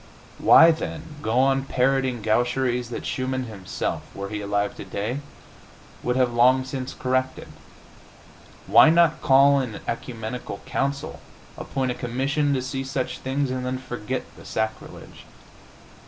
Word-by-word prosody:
Why, 165 +1 +8
then, 160 -1 -6
go 115 -3 -1
on 135 +1 +3
parroting 130 -3 0
gaucheries 120 +2 0
that 120 - -6
Schumann 130 0 -2
himself, 100 -6 -4
were 100 0 -5
he 105 0 -4
alive 100 0 -1
today, 105 +7 -4 0.8
would 125 - -1
have 125 -2 +2
long 130 +2 +4
since 130 0 -5
corrected? 130 0 -1 1.2
Why - - +7
not 165 -1 +4
call 140 -1 +5
an 125 -5 -4
ecumenical 115 0 -5
council, 140 +2 -2 0.4
appoint 130 -2 -2
a - - -1
commission 135 +5 -1
to 130 - -2
see 135 +1 -3
to 135 - -8
such 135 -1 -3
things, 135 0 -1
and 130 0 -3
then 130 0 -2
forget 130 -1 -4
the - - -13
sacrilege? 110 0 -5
130 Hz, 140 wpm, -24 LUFS, 120-135 Hz, 1.2 s, Why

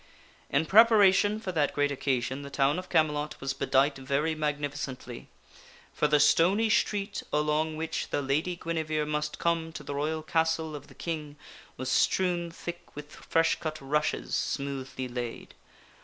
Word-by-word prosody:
In 145 +3 +2
preparation 210 0 +5
for 195 -4 -4
that 150 -5 0
great 145 0 +2
occasion 130 -1 -1
the 140 - -8
town 140 +4 +1
of 185 - -9
Camelot 150 -2 +1
was 135 0 -2
bedight 135 +1 +2
very 140 +4 0
magnificently, 145 -5 -4 0.7
for 150 - +2
the 150 0 +3
stony 190 +9 +4
street 200 -2 0
along 150 +1 0
which 160 0 -3
the 145 - -1
Lady 150 +6 0
Guinevere 160 -3 -2
must 150 0 -2
come 165 -1 0
to 155 -1 -7
the - - -5
royal 155 +2 -2
castle 160 -1 0
of 145 -1 -9
the - - -16
King 155 -3 -5 0.4
was 130 0 -3
strewn 175 -2 +2
thick 175 +1 -8
with 150 0 -9
fresh 165 0 +1
cut 155 -1 -4
rushes 150 +2 -1
smoothly 135 -2 -3
laid. 120 -1 -6
150 Hz, 155 wpm, -28 LUFS, 140-165 Hz, 0.7 s, preparation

